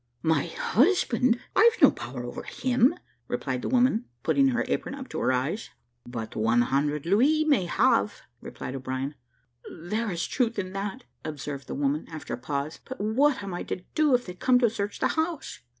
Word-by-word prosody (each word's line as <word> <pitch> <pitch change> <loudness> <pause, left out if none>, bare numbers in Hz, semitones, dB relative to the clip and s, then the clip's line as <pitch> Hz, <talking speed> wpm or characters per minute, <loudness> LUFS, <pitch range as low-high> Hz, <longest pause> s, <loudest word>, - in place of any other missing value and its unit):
"My 160 -3 +2
husband! 250 - +2 0.2
I've 460 +3 +5
no - - +8
power - - -7
over - - -6
him," 250 0 +2 0.3
replied 125 0 -2
the - - -3
woman, 250 -2 +3 0.2
putting 275 -1 +4
her 250 -2 +1
apron 270 - -2
up 265 -2 -8
to - - -4
her - - +2
eyes. 135 - -1 0.4
"But 115 -2 -6
one 115 +2 +3
hundred 145 +3 0
louis 275 - +3
may 280 -12 +3
have," 230 +2 +2 0.2
replied - - -7
O'Brien. 130 +1 -3 0.6
"There 210 +7 -3
is 175 -2 -2
truth 235 -3 0
in 185 -1 -3
that," 205 +6 -4 0.2
observed 145 -2 -6
the - - -4
woman, 145 +2 0
after 155 -2 -6
a - - -2
pause; 140 +4 -3
"but 260 - -8
what 240 +4 +2
am 195 -2 -5
I 175 - -3
to 180 - -5
do, 300 -4 +4
if 245 - -1
they 180 - -6
come 250 +7 +3
to 235 -3 +4
search 205 -2 -3
the - - +1
house?" 320 - -2
205 Hz, 185 wpm, -27 LUFS, -, 0.6 s, no